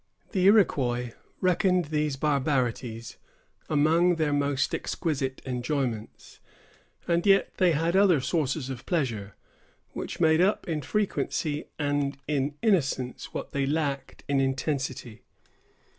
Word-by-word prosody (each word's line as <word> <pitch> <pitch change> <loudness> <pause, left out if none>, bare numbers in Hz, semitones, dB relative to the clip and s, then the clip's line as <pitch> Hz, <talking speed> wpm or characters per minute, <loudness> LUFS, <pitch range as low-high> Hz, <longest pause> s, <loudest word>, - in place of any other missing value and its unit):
The 185 -4 +1
Iroquois 125 - +3 0.3
reckoned 185 -1 +2
these 150 -1 -1
barbarities 130 -5 -1 0.5
among 160 +4 +3
their 155 -3 0
most 145 0 0
exquisite 135 -6 -2
enjoyments, 125 -3 -3 0.7
and 170 0 +2
yet 195 -1 +3
they 180 -3 +4
had 165 +4 0
other 190 -6 +5
sources 140 -1 -1
of 125 -2 -8
pleasure, 115 - -2 0.6
which 170 - -6
made 160 0 +4
up 195 +3 +1
in 160 -3 -2
frequency 160 -4 -1
and 145 -2 -1
in 145 -1 -1
innocence 135 - 0
what - - -5
they 140 -1 -1
lacked 140 -3 -2
in 140 -1 +2
intensity. 135 -4 -2
145 Hz, 115 wpm, -27 LUFS, 130-170 Hz, 0.7 s, other